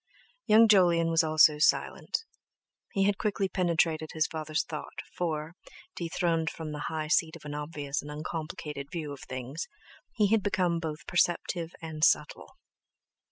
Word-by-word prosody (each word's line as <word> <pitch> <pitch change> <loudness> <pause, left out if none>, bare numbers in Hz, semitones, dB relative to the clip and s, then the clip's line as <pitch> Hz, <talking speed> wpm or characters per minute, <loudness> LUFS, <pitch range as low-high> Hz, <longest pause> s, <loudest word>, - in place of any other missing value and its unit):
Young 225 +2 +7
Jolyon 175 -5 +5
also 155 -1 +5
was 150 +1 +5
silent; - - -1 0.7
he 195 - +2
had 200 0 +1
quickly 205 -2 0
penetrated 165 -4 0
his 160 -1 +2
father's 155 -1 -2
thought, 155 -2 -7 0.2
for, 160 -2 -2 0.4
dethroned 165 -1 0
from 160 -2 -7
the 150 -1 -5
high 155 -1 -3
seat 160 0 +2
of - - -13
an 145 - -5
obvious 145 -1 -3
and 145 - -10
uncomplicated 150 -1 -5
view 155 -4 -4
of 140 - -10
things, 130 +5 -6 0.5
he 210 -3 +3
had 225 -1 +4
become 185 -3 +1
both 160 -1 -5
perceptive 175 -1 0
and 155 -1 -5
subtle. - - +1
160 Hz, 150 wpm, -29 LUFS, 150-175 Hz, 0.7 s, Young